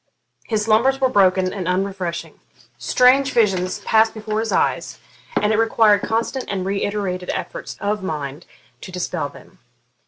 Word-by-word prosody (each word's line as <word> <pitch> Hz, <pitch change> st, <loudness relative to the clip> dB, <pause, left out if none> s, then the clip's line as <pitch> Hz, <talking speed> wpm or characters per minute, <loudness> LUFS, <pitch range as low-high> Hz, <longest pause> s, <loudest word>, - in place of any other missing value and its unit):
His 215 Hz, -2 st, 0 dB
slumbers 235 Hz, +5 st, +3 dB
were 260 Hz, -1 st, +3 dB
broken 185 Hz, -3 st, +3 dB
and 185 Hz, -4 st, -4 dB
unrefreshing; 180 Hz, -3 st, -3 dB, 0.4 s
strange 255 Hz, -, +4 dB
visions 190 Hz, -5 st, +1 dB
passed 220 Hz, 0 st, +3 dB
before 215 Hz, 0 st, -3 dB
his 225 Hz, 0 st, -2 dB
eyes, -, -, 0 dB, 0.4 s
and 210 Hz, +1 st, +1 dB
it 215 Hz, -, +2 dB
required 220 Hz, -2 st, +4 dB
constant 230 Hz, +4 st, -2 dB
and 190 Hz, -2 st, -3 dB
reiterated 195 Hz, -2 st, -2 dB
efforts -, -, -6 dB
of 205 Hz, 0 st, -1 dB
mind 150 Hz, -3 st, -5 dB, 0.3 s
to 185 Hz, -, -9 dB
dispel 180 Hz, -1 st, -3 dB
them. -, -, -17 dB
205 Hz, 145 wpm, -21 LUFS, 185-225 Hz, 0.4 s, strange